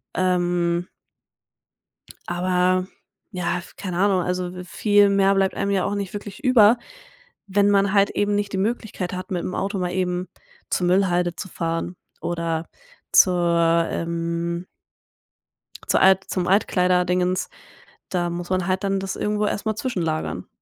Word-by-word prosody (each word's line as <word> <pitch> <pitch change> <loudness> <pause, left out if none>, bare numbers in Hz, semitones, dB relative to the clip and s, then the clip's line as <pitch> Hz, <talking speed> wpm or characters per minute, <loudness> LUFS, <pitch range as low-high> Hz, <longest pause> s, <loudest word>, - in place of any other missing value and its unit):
Ähm 175 -1 +1 1.4
aber 180 +1 +1 0.4
ja, 180 -3 -1
f 175 - -14
keine 180 -3 -5
Ahnung, 195 -2 +3
also 180 0 -3
w 180 - -7
viel 205 +2 +3
mehr 195 0 +3
bleibt 195 -1 +2
einem 200 0 -1
ja 190 -2 +1
auch 205 +1 -1
nicht 200 -2 -4
wirklich 205 +5 -8
über, 240 -3 +6 0.7
wenn 200 +1 +3
man 200 -1 +3
halt 200 -1 +4
eben 205 0 0
nicht 205 -1 -1
die - - -1
Möglichkeit 205 -3 -2
hat, 185 0 -6
mit 180 -2 -2
‘m 185 - -4
Auto 195 +1 -2
mal 180 -1 -1
eben 180 0 -1 0.4
zur 180 - 0
Müllhalde 180 -2 +2
zu - - -6
fahren 165 +2 -3 0.3
oder 170 -1 -2 0.4
zur, 170 -2 +4
ähm 170 +1 -3 1.2
zur - - +3
Alt 190 0 +5
zum 180 -2 -1
Altkleider-Dingens. 180 -2 +2 0.6
Da 175 -2 -1
muss 175 0 -5
man 185 -1 0
halt 190 0 0
dann 195 0 +1
das 190 0 -4
irgendwo 210 0 -1
erst 205 - -3
mal 215 - +1
zwischenlagern. 175 -11 -3
185 Hz, 150 wpm, -23 LUFS, 175-200 Hz, 1.4 s, über